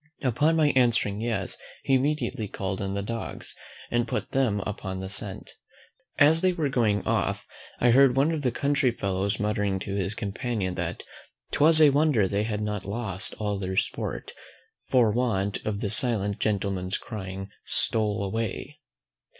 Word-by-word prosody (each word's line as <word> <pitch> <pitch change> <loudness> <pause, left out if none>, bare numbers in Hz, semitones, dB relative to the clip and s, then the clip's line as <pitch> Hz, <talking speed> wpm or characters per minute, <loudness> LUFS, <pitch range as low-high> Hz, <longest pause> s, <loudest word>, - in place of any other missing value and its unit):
Upon 145 +6 +2
my 155 -2 +4
answering 115 -5 +2
yes, 115 -1 0 0.2
he 135 - +1
immediately 135 -5 0
called 95 -1 -4
in 95 0 -3
the 100 - -2
dogs, 115 +2 -5 0.4
and 120 0 +1
put - - -3
them 125 -7 +1
upon 95 -1 -5
the 95 0 -5
scent. 100 -1 -1 0.7
As 155 +3 +6
they 185 -1 +3
were 160 -5 -1
going 110 -6 +1
off, - - 0 0.3
I 120 - +4
heard 135 +1 +6
one 140 +4 +3
of 160 -2 -2
the 130 - +1
country 140 +2 +1
fellows 100 -3 -2
muttering 105 -2 0
to 100 - -4
his 100 +1 -1
companion, 105 -2 -3
that - - -4 0.5
'twas 155 +2 +6
a 150 -2 +7
wonder 140 -8 +3
they 100 +2 -1
had 105 -1 -2
not 105 -2 -3
lost 100 -2 -2
all 105 -2 -2
their 95 -1 -3
sport, - - -2 0.6
for 120 -4 +4
want 105 -4 -1
of 105 -1 -2
the 105 - -1
silent 105 -5 +1
gentleman's 95 -3 -1
crying 95 -2 -7
STOLE 110 -2 0
AWAY. 115 +8 -4
110 Hz, 160 wpm, -26 LUFS, 100-130 Hz, 0.7 s, a